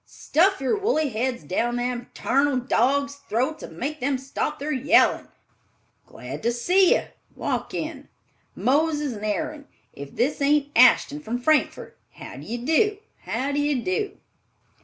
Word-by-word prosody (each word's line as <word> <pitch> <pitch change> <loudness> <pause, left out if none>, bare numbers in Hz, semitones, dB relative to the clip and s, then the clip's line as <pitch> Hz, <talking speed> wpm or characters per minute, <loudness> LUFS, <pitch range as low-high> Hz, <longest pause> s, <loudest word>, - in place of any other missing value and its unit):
Stuff 380 +5 +1
your 270 +6 +1
woolly 395 -8 0
heads 245 -3 -2
down 235 +10 -1
them 245 0 -3
tarnal 275 +1 +1
dogs' 280 +3 +1
throats 260 +8 -1
and 165 - -10
make 300 - -4
them 270 +1 0
stop 265 +1 -3
their 295 +2 -4
yellin'! 290 +5 +3 0.8
Glad - - -8
to 235 - +1
see 360 +11 +4
you—walk - - -5
in. - - -5 0.5
Moses 295 0 +1
and 210 -1 -9
Aaron! 285 +8 -3 0.3
If 140 0 -10
this 275 +5 0
ain't 290 0 +2
Ashton 255 +4 +5
from 240 -5 -4
Frankfort. 305 +5 0
How - - -10
d'ye 240 - -5
do? 410 +7 +2 0.3
How 275 +2 -2
d'ye 290 0 +1
do?" 235 - -2
275 Hz, 140 wpm, -24 LUFS, 245-300 Hz, 0.8 s, Ashton